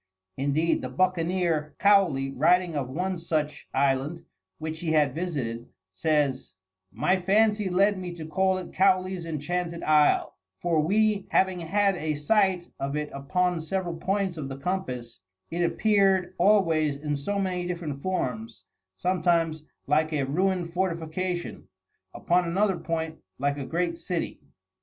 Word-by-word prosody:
Indeed 145 +5 +1
the 130 - -4
buccaneer, 170 0 0
Cowley, 185 -10 +3
writing 170 +4 +2
of 135 -3 -2
one 180 +6 -2
such 150 -3 -2
island 140 +4 0 0.3
which 160 0 -5
he 160 -2 -1
had 150 -4 +3
visited, 135 -9 -3 0.2
says: 145 +6 0 0.4
"My 165 - +1
fancy 210 +1 +3
led 195 +2 +3
me 180 -1 -5
to 165 -2 -7
call 190 +3 +1
it 185 - -7
Cowley's 185 -2 +2
Enchanted 170 +2 -3
Isle, 150 -1 +3 0.2
for 170 -2 +1
we 205 +5 +2
having 190 -1 +2
had 195 +4 +1
a 155 0 -2
sight 185 +3 +2
of 140 +1 -2
it 150 0 -3
upon 175 +5 0
several 175 +1 -2
points 190 0 -1
of 140 -3 -5
the 135 - -6
compass, 135 - -4 0.3
it 170 +1 -2
appeared 195 -1 +2
always 165 -8 +3
in 150 0 -2
so 200 +9 -2
many 180 -2 -1
different 165 -6 -4
forms; 115 - -3 0.3
sometimes 165 - +1 0.2
like 155 +2 +2
a 145 -2 +1
ruined 175 +3 0
fortification; 175 0 -3 0.5
upon 180 0 +2
another 190 +2 +1
point 160 -1 -3 0.2
like 140 +1 -1
a 135 - -4
great 170 0 -1
city." 175 -2 -3
170 Hz, 140 wpm, -27 LUFS, 150-185 Hz, 0.5 s, Cowley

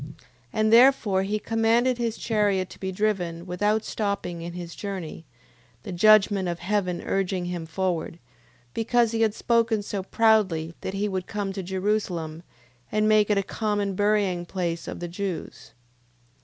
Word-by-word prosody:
And 215 +1 +2
therefore 235 -6 +5
he 205 +2 -1
commanded 230 +3 +1
his 230 -2 -1
chariot 205 -4 0
to - - -12
be 190 0 -3
driven, 180 -4 -1
without 205 +4 0
stopping 200 -5 -3
in 170 +1 -6
his 175 -1 -7
journey, 185 -5 -6 0.6
the - - -6
judgment 200 0 +4
of 170 - -3
heaven 185 -1 -1
urging 190 -2 -1
him 175 -2 -4
forward, 170 -1 -2 0.6
because 230 0 +2
he 225 0 -1
had 220 -1 +2
spoken 230 -2 +1
so 200 -1 -3
proudly, 190 -6 +2
that 190 - -4
he 205 +1 0
would 190 -2 -3
come 200 -2 -3
to 195 - -4
Jerusalem, 185 -4 -2 0.5
and 215 0 +2
make 215 -1 +4
it 210 - +3
a 200 - +2
common 205 -1 -1
burying 205 -3 +1
place 170 -2 -3
of - - -6
the 175 - -3
Jews. 185 0 -6
200 Hz, 155 wpm, -25 LUFS, 180-215 Hz, 0.6 s, therefore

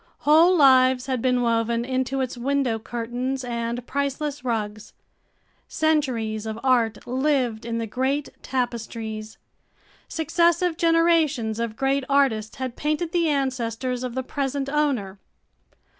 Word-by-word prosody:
Whole 325 +5 +5
lives 260 -3 +5
had 260 -3 -2
been 250 -1 +2
woven 230 0 +1
into 260 +1 -1
its 260 -1 -3
window 255 -2 0
curtains 245 +4 -3
and 235 0 -3
priceless 280 +1 -2
rugs; 215 -3 -3 0.7
centuries 245 -9 0
of 220 0 -4
art 240 -4 +1
lived 255 -4 0
in 230 -1 -2
the 230 - -2
great 265 +6 -1
tapestries; 225 -3 -4 0.7
successive 335 +2 +1
generations 330 -9 +2
of 230 -2 -2
great 270 +1 +1
artists 260 -6 +2
had 255 -2 -4
painted 305 +3 -1
the 340 -3 +2
ancestors 255 -3 -1
of 250 -1 -4
the 260 - -1
present 275 0 -3
owner. 265 -10 -1
255 Hz, 125 wpm, -24 LUFS, 230-280 Hz, 0.7 s, Whole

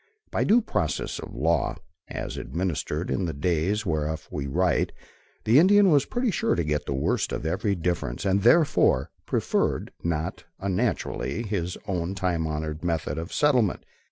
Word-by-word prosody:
By - - +1
due 235 +4 +5
process 80 - -2
of - - -8
law, 80 +3 +1 0.3
as - - -5
administered 85 -2 -2
in 95 - 0
the 80 - -2
days 90 +7 0
whereof 80 -2 -2
we 70 -2 -3
write, 90 +6 +1 0.5
the 115 +6 +6
Indian 195 +2 +6
was 145 -2 +4
pretty 245 -2 0
sure - - +1
to 85 - 0
get 75 -1 -1
the 70 - -1
worst 65 - 0
of - - -3
every 100 +5 0
difference, 85 -5 -2
and 100 +1 +2
therefore, 140 - +4 0.2
preferred, - - 0
not 80 -1 -2 0.2
unnaturally, 100 - -1
his 95 -5 -2
own 90 -1 -2
time 90 -4 0
honored 75 +1 -4
methods 80 -3 -1
of 85 - -8
settlement. 125 -10 +2
85 Hz, 155 wpm, -26 LUFS, 80-105 Hz, 0.5 s, the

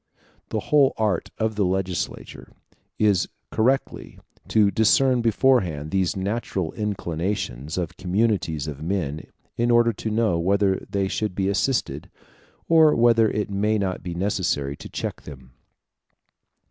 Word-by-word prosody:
The - - -2
whole 140 -3 +5
art 105 -5 0
of 110 0 0
the 105 - +1
legislator 95 -1 -3 0.5
is 100 -5 +2 0.2
correctly 130 +5 -1 0.3
to 105 -2 +3
discern 125 +4 +3
beforehand 105 - +1
these 95 -2 0
natural 95 -3 -2
inclinations 85 - -3
of 90 -1 -3
communities 95 -6 0
of 75 -2 -7
men, 80 -4 -3 0.3
in 120 +1 +1
order 120 -1 +4
to 110 - -5
know 110 -5 +1
whether 95 +2 +1
they 100 -1 0
should 105 0 -2
be 95 0 0
assisted, 100 - -1 0.6
or 160 -2 +5
whether 115 -2 +4
it 105 -1 -3
may 105 +2 +1
not 95 -3 -2
be 90 -1 -6
necessary 85 -7 -1
to - - -10
check - - -5
them. 65 -3 -12
100 Hz, 135 wpm, -23 LUFS, 85-110 Hz, 0.6 s, whole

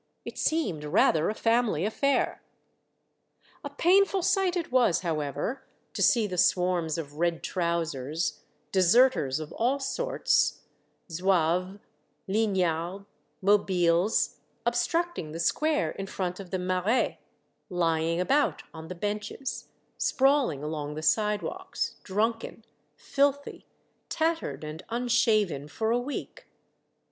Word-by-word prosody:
It - - -7
seemed 245 - 0
rather 155 +1 +3
a 215 - -2
family 225 -8 +1
affair. 275 +6 0 1.2
A 285 - -4
painful 380 +5 +3
sight 385 -1 +2
it 335 - -4
was, 245 -9 +3
however, 155 - -3 0.3
to - - -4
see 230 -3 +4
the 185 -3 -3
swarms 175 -4 +2
of 150 -2 -7
red 170 -1 0
trousers, 165 -3 -2 0.3
deserters 190 - +4
of 155 -1 -7
all 250 +5 +1
sorts - - 0 0.2
— - - -25
Zouaves, 180 +1 +1 0.5
lignards^ 190 -3 0 0.4
mobiles 185 -1 +2
— - - -42
obstructing 240 - -1
the 165 - -5
square 300 - +1
in 195 - -6
front 180 -1 -3
of 195 -2 -9
the 185 - -1
mairiey 185 +6 0 0.5
lying 165 -2 0
about 275 +11 +1
on 160 0 -9
the 185 - -6
benches, 210 +7 -4 0.3
sprawling 270 - +2
along 150 -1 -4
the 155 - -6
sidewalks, 210 - -1
drunken, 225 +3 -2 0.3
filthy, 285 0 -1 0.4
tattered, 325 - -1
and 155 +2 -6
unshaven 225 - +1
for 220 +9 -2
a 240 - +2
week. 270 +4 -6
195 Hz, 115 wpm, -28 LUFS, 165-250 Hz, 1.2 s, see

